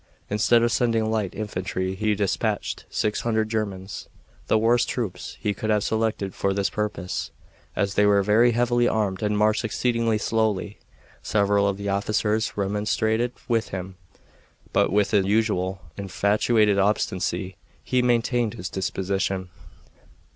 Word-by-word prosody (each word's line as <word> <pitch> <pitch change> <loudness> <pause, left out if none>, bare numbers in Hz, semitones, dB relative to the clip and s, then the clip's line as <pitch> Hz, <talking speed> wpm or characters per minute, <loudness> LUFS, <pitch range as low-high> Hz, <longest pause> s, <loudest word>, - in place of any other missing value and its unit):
Instead 115 +3 +3
of 120 - +2
sending 115 -2 +1
light 105 -4 -1
infantry 95 -2 -3
he 105 +2 0
dispatched 100 -1 -1
six 105 0 -1
hundred 110 -2 0
Germans 100 -4 -4 0.4
the - - +3
worst 115 +2 +3
troops 100 -8 -4
he 105 - -1
could 110 +2 -4
have 105 -1 +2
selected 110 -3 -1
for 95 0 -1
this 100 -1 0
purpose, 105 -4 -3 0.5
as 100 -1 0
they 105 +1 +4
were 100 -1 +4
very 115 +4 +4
heavily 120 +1 +2
armed 100 -5 0
and 105 -1 0
marched 105 +1 +2
exceedingly 115 0 0
slowly. 105 -2 -1 0.4
Several 100 -1 +2
of 100 -1 -1
the 100 0 -4
officers 105 +2 0
remonstrated 105 +4 0 0.2
with 115 -2 0
him, 95 0 -5 0.8
but - - +3
with 105 +1 +2
his 100 -3 +3
usual 95 -4 0
infatuated 100 +2 +2
obstinacy 95 -2 0 0.3
he 125 -1 +1
maintained 120 -2 +1
his 90 - -5
disposition. 95 0 -2
105 Hz, 140 wpm, -24 LUFS, 100-110 Hz, 0.8 s, they